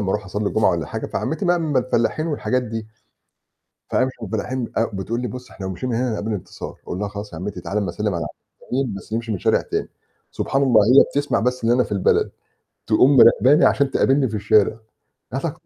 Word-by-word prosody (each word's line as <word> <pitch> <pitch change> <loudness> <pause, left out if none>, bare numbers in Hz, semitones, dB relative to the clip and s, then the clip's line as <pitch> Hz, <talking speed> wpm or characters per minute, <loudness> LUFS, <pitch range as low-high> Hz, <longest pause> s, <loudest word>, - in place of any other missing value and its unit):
لمّا 100 -2 -1
أروح 105 +1 -1
أصلّي 100 +2 -2
الجُمعة - - +2
والّا - - -2
حاجة. - - -5
فعمّتي 160 +6 -3
بقى 175 -1 +2
من 155 -4 -1
الفلّاحين 130 +4 +1
والحاجات 130 -5 -1
دي. 115 -1 -5 1.0
فأمشي 130 0 0
مع 110 - -5
الفلاحين، 120 +4 -3
أ 115 - +3
بتقول 115 +5 -3
لي: 125 - -2
"بُص، 125 +2 -9
إحنا 95 - -8
لو 95 - -3
مشينا 125 +8 -4
من - - 0
هنا، 125 0 0
هنقابل 110 0 -3
انتصار."، 100 - -7
أقول 90 - -5
لها: 105 - -1
"خلاص 100 -1 -8
يا 80 - -6
عمّتي، 95 0 -5
تعالي 105 +4 -2
أمَا 100 -3 -2
أسلّم 105 +3 -2
على 85 -1 -2
عم 75 - -5 0.4
مين، 130 -4 0
بس 100 +2 -8
نمشي 115 0 -2
من 100 - -2
شارع - - +2
تاني." - - -3 0.4
سبحان 135 - -1
الله، 120 -6 +5
هي 125 +5 +7
بتسمع 145 +1 -1
بس 125 +1 -1
إن 115 - +3
أنا 125 +1 +4
في - - -10
البلد، 100 -2 +2 0.6
تقوم 130 +6 +4
مراقباني 130 +4 +6
عشان 140 0 +3
تقابلني 135 0 +2
في 110 - -7
الشارع. 105 +1 +3 0.6
"يا - - -1
دكتور." - - -3
115 Hz, 225 wpm, -21 LUFS, 105-130 Hz, 1.0 s, هي